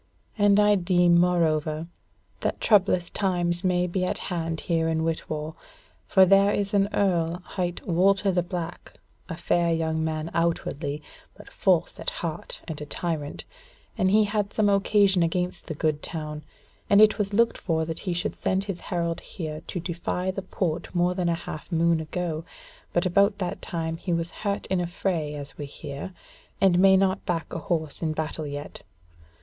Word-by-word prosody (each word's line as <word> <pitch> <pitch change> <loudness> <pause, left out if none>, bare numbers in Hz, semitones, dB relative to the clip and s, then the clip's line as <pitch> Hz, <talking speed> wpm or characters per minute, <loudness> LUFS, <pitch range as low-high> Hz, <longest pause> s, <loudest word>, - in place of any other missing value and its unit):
And 205 -1 +4
I 210 0 +5
deem, 175 -2 +4
moreover, 160 -3 +1 0.5
that - - -2
troublous 190 -4 +3
times 175 -3 0
may 180 -1 +2
be 180 +1 -1
at 185 - -1
hand 165 -3 -3
here 165 -1 0
in 160 0 0
Whitwall. 155 -1 -3 0.5
For 190 -2 +6
there 195 +2 +5
is 200 0 -1
an 200 0 +3
Earl 175 -3 +1
hight 180 -2 -3
Walter 195 +3 +3
the 180 -1 +2
Black, 175 -1 -6 0.4
a 165 - -5
fair 170 -1 +1
young 160 -1 0
man 160 0 -2
outwardly, 155 -3 -1 0.3
but - - -14
false - - +1
at - - -2
heart - - -5
and 155 -3 -6
a - - -4
tyrant, 155 -3 -3 0.5
and 190 -4 +2
he 215 +2 +5
had 205 -1 -1
some 210 -2 +2
occasion 200 -1 +3
against 180 +2 -1
the 160 - -4
good 155 -1 0
town, 150 -2 -5 0.5
and 200 - +6
it 215 +1 +6
was 205 -1 0
looked 230 +3 +2
for 160 -2 0
that 165 0 -5
he 180 - -2
should 175 - -1
send 190 +1 0
his 195 -3 -5
herald 170 -3 -2
here 155 -3 -6
to 180 - -3
defy 180 +2 -2
the 195 - -4
Port 175 -2 -3
more 175 +1 +2
than 180 -2 0
a 170 - +2
half 160 -1 -8
moon 165 0 +3
ago; 160 0 -3 0.5
but 175 +2 +1
about 200 +3 +3
that 180 -3 -3
time 165 -1 -3
he 175 - -4
was 170 0 -1
hurt 200 -1 -3
in 185 -1 0
a 175 - -1
fray 170 -4 -2
as 145 0 -8
we 145 - -4
hear, 140 +4 -7 0.5
and 185 -2 +4
may 190 0 +7
not 190 0 +1
back 165 -2 -2
a 170 - -2
horse 160 -2 -2
in 160 -2 0
battle 155 0 -3
yet. 145 +1 -7
175 Hz, 180 wpm, -26 LUFS, 160-190 Hz, 0.5 s, may